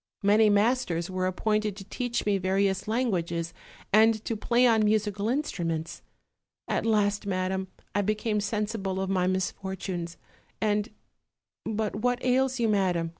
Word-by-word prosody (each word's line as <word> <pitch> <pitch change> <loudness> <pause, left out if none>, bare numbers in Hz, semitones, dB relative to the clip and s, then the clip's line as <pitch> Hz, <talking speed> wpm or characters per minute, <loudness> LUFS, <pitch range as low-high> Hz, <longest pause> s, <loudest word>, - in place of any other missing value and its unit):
Many 210 +2 +5
masters 205 -5 +1
were 185 0 0
appointed 210 +2 0
to 195 - -9
teach 240 +4 -3
me 200 -2 +2
various 190 +1 0
languages 175 -8 -1 0.4
and 220 0 +4
to 230 - -1
play 240 +3 +2
on 225 -3 +4
musical 210 0 +1
instruments; 170 - -2 0.7
at - - -1
last, 205 -2 +1
madam, 190 0 -1 0.3
I 205 - +2
became 215 +1 0
sensible 210 -2 -2
of 190 0 -2
my 185 -1 +1
misfortunes, 185 -2 -3 0.4
and 210 +1 0 0.8
but 215 -1 -2
what 245 +3 +1
ails 260 +1 +2
you, 230 - +2
madam?" 185 -5 +1
205 Hz, 135 wpm, -27 LUFS, 185-220 Hz, 0.8 s, Many